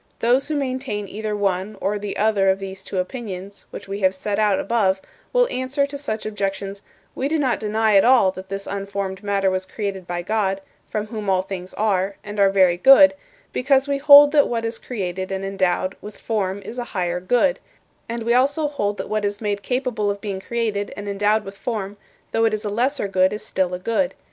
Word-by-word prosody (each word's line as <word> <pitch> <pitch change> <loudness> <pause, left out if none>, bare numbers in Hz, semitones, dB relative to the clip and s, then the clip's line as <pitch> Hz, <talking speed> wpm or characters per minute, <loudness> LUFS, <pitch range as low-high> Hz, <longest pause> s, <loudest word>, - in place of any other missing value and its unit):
'" - - -36
Those 245 +4 +2
who 310 - -2
maintain 255 -7 -2
either 215 +1 -4
one 195 +1 -1
or 205 +1 -1
the 205 -1 -5
other 205 -3 +3
of 190 - +3
these 195 -1 -7
two 190 - -6
opinions 195 -1 -5
which 200 - -9
we 200 +1 -4
have 190 -1 +2
set 200 +2 -2
out 210 -3 +3
above 200 -4 +1 0.3
will - - +3
answer 265 - 0
to 280 +1 -8
such 225 -7 -4
objections: 200 -1 -3 0.3
"We 270 - -2
do 320 +2 0
not 265 -5 +1
deny 215 0 +1
at 195 - +7
all 240 -6 +5
that 190 0 -10
this 195 0 -4
unformed 195 -1 -4
matter 200 -2 +1
was 185 0 -2
created 195 -4 -4
by 175 0 -3
God, 195 -1 0 0.3
from 215 -1 -2
whom 215 -2 -5
all 185 -1 +2
things 185 -1 -7
are, 200 -2 0
and 205 0 -6
are 200 -1 +6
very 185 -3 +4
good 275 +7 +8 0.4
because 270 +1 +2
we 280 -1 0
hold 290 0 +9
that 295 -2 +4
what 230 -1 -2
is 225 0 -3
created 190 -5 -4
and 195 0 -3
endowed 190 -1 0
with 210 0 -10
form 200 -3 -2
is 245 - -7
a - - -2
higher 175 -1 0
good; 245 - +2 0.5
and 230 0 -3
we 235 +1 +2
also 280 +5 +2
hold 205 -8 -2
that - - -5
what 215 0 -1
is 205 0 -2
made 205 -2 -2
capable 250 -4 -1
of 200 0 -2
being 200 -2 -4
created 215 -3 -2
and 205 0 -6
endowed 205 +2 +1
with 195 +1 -8
form, 205 -3 -4 0.4
though 225 0 +2
it 220 -1 +2
is 215 - -7
a 205 - -2
lesser 250 +2 0
good, 185 -1 +3
is 210 - -5
still 185 -1 0
a 180 - -2
good. 230 +8 -1
205 Hz, 215 wpm, -22 LUFS, 195-235 Hz, 0.5 s, hold